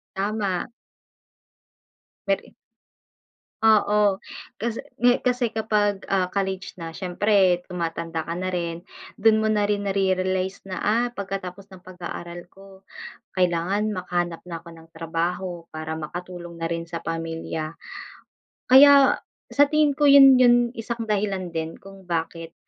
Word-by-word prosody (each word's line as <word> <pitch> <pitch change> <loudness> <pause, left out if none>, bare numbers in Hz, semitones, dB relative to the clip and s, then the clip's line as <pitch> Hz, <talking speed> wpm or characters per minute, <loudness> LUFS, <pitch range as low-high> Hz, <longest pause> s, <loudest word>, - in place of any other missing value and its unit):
Tama. 200 0 -2 1.6
Peri 195 0 -2 1.1
Oo, 210 -2 +4 0.4
kasi 230 +1 -3 0.2
ngi 245 +1 +3
kasi 250 -1 +1
kapag, 210 -2 0
ah, 190 -2 +2
college 190 0 -3
na 165 -2 -7
siyempre 185 0 +2
tumatanda 165 -2 -3
ka 170 - -3
na 185 +1 -3
rin, 170 -1 -3 0.3
dun 220 +1 +4
mo 220 - +1
na 215 -1 +2
rin 205 0 -1
nare-realize 190 0 -1
na 185 - -5
ah, 230 +4 +2
pagkatapos 195 -1 -5
ng 190 - -12
pag-aaral 175 -1 -8
ko 195 0 -16 0.5
kailangan 185 +4 +1
makahanap 175 -3 -2
na 170 -2 -7
ako 170 - -13
ng 165 0 -15
trabaho 170 +1 -3
para 160 0 -4
makatulong 175 +2 -7
na 165 0 -3
rin 165 0 -3
sa 165 0 -6
pamilya. 165 -1 -4 1.0
Kaya 280 +1 +8 0.3
sa 285 0 +5
tingin 305 -1 +3
ko 290 +2 +1
yun 275 -2 +9
yung 245 -1 +6 0.2
isang 235 +1 -4
dahilan 200 -4 -1
din 160 0 -4
kung 195 -1 -14
bakit, 165 -1 -4
185 Hz, 130 wpm, -24 LUFS, 170-210 Hz, 1.6 s, yun